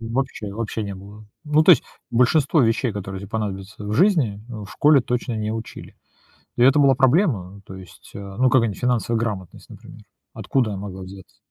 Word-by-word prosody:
Вообще, 115 -3 -4
вообще 110 +1 -4
не 100 -1 -5
было. 100 +3 -13 0.2
Ну 150 +1 +3
то 175 - +6
есть 170 - +6 0.3
большинство 140 +5 +3
вещей, 115 0 +1
которые 100 -1 -6
тебе 100 - -9
понадобятся 105 -2 -5
в 105 - -4
жизни, 140 - +2
н 110 -3 -7
в 100 - -12
школе 150 -1 +4
точно 120 0 -3
не 110 0 -2
учили. 115 0 -8 0.6
И 120 - +1
это 135 +3 +5
была 140 -2 +5
проблема. 125 - +1
То 95 - -10
есть, 95 -2 -14
э, - - -7 0.2
ну 130 0 +3
какая-нибудь 115 -6 +2
финансовая 120 -2 0
грамотность, 105 -6 -5
например. - - -13 0.3
Откуда 120 -6 -1
она 95 - -5
могла 95 -2 -7
взяться? 95 0 -12
115 Hz, 190 wpm, -22 LUFS, 100-130 Hz, 0.6 s, то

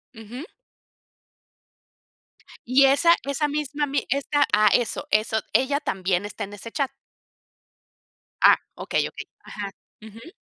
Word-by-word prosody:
Ujú. 235 - -9 2.2
Y 265 +3 +5
esa 335 +5 +5
esa 280 +2 -1
misma 295 0 -3
ami 285 0 -2
esta 280 +2 +1
¡Ah! 210 0 +5
Eso, 245 +4 0
eso, 220 +1 +2
¿ella 280 +2 +2
también 190 -9 -1
está 205 +1 -6
en 205 - -12
ese 225 +3 -9
chat? 275 -3 -1 1.5
Ah, - - +8 0.2
okey, - - -1
okey, - - -9 0.2
ajá, 205 -2 -6 0.3
ujú. 225 +7 -12
260 Hz, 120 wpm, -24 LUFS, 215-285 Hz, 2.2 s, Ah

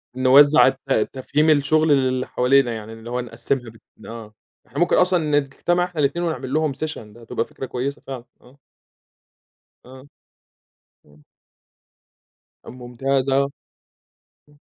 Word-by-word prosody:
نوزّع 140 +3 +6
الت 135 -4 0
تفهيم 150 +4 0
الشغل 155 +2 +3
للي 130 -3 +2
حوالينا، 125 -1 +2
يعني 110 +1 -8
اللي 115 +1 -11
هو 125 +1 -2
نقسّمها 120 +1 -3 0.3
ب - - -16
آه، 115 -2 -10 0.3
إحنا - - -6
ممكن 175 - +3
أصلًا 165 -5 +3
نجتمع 175 +6 -1
إحنا 175 -4 -8
الاتنين 170 +5 0
ونعملّهم 155 -1 -1
session، 155 +3 -5
ده 110 +2 -13
هتبقى 115 - -3
فكرة 135 - -8
كويسة 130 +3 -4
فعلًا، 125 -3 -7 0.2
آه. 130 +3 -20 1.3
آه، 130 +1 -14 1.0
إمم. 75 0 -22 1.5
ممتاز 130 +2 -2
آه. 140 +1 +2 1.0
امم. 145 0 -24
135 Hz, 125 wpm, -21 LUFS, 125-145 Hz, 1.5 s, نوزّع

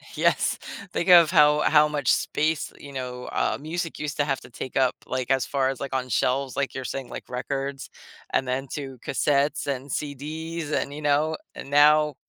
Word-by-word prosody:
Yes, - - +2 0.3
think 170 - -2
of 170 -3 +8
how 150 -3 +5
how 150 0 +5
much 145 -4 +1
space, 155 0 0
you 140 - -11
know, 125 -2 -5
uh, - - 0
music 165 +2 -4
used 150 -1 -4
to 145 - +2
have 135 -2 -1
to 125 - -13
take 120 +2 -7
up, 130 -2 +3
like, 130 0 -2
as 135 -2 +2
far 135 -2 0
as, 135 - -4
like, 135 -1 -4
on 130 -1 -2
shelves, 130 +3 0
like, 140 -1 -1
you're 130 - -4
saying, 130 +1 -4
like, - - -9
records 135 +2 -4 0.4
and - - +2
then 130 +2 -2
to 135 -3 -6
cassettes 145 0 +1
and 140 0 -3
CDs 155 +3 -4
and, 140 - -1
you 150 - -7
know, 150 +2 +2 0.2
and - - -8
now 150 +1 +5
140 Hz, 195 wpm, -25 LUFS, 130-150 Hz, 0.4 s, of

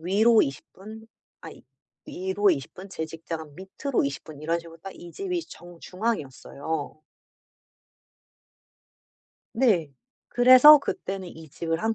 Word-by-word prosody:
위로 215 +7 +4
20 135 - -6
분 220 +3 -12 0.3
아니 - - -12 0.4
위로 190 +2 0
20 140 -8 -3
분 190 +2 -11
제 160 -4 -5
직장은 160 -1 -8
밑으로 190 - -3
20 140 0 -4
분 150 -2 -12
이런 165 +2 -1
식으로 165 -1 -13
딱 195 +3 -10
이 175 -1 -12
집이 360 -3 -4
정중앙이었어요. 160 - -5 2.5
네. 195 - +1 0.4
그래서 255 +5 +8
그때는 190 -8 -5
이 160 -1 -13
집을 165 +3 -4
한 225 0 0
180 Hz, 215 characters per minute, -25 LUFS, 160-220 Hz, 2.5 s, 그래서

